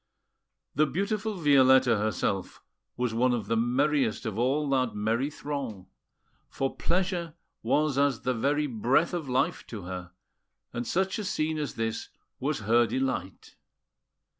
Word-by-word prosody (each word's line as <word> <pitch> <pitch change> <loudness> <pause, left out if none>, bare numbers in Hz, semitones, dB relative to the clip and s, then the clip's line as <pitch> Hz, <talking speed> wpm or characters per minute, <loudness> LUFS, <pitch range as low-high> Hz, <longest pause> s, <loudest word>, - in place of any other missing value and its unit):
The 155 +2 +3
beautiful 210 +6 -2
Violetta 130 -6 +5
herself 100 -3 -2 0.3
was 125 -2 -1
one 125 +2 +2
of 110 -4 -3
the 115 - 0
merriest 125 +2 +1
of 110 -3 -3
all 135 +6 +1
that 130 -5 +1
merry 115 +6 0
throng; 140 -10 -5 0.6
for 135 0 -2
pleasure 175 -2 -1 0.3
was 150 -2 +1
as 140 -4 +2
the 130 - 0
very 145 +6 +1
breath 130 - +1
of 165 -6 -3
life 125 - 0
to 105 -5 -7
her, 90 -1 -7 0.6
and 120 0 -3
such 190 +3 0
a - - -3
scene 155 -4 -1
as 145 -3 -3
this 115 0 -3 0.3
was 140 -1 -1
her 115 +3 +3
delight. 110 -7 -3
130 Hz, 140 wpm, -28 LUFS, 115-150 Hz, 0.6 s, Violetta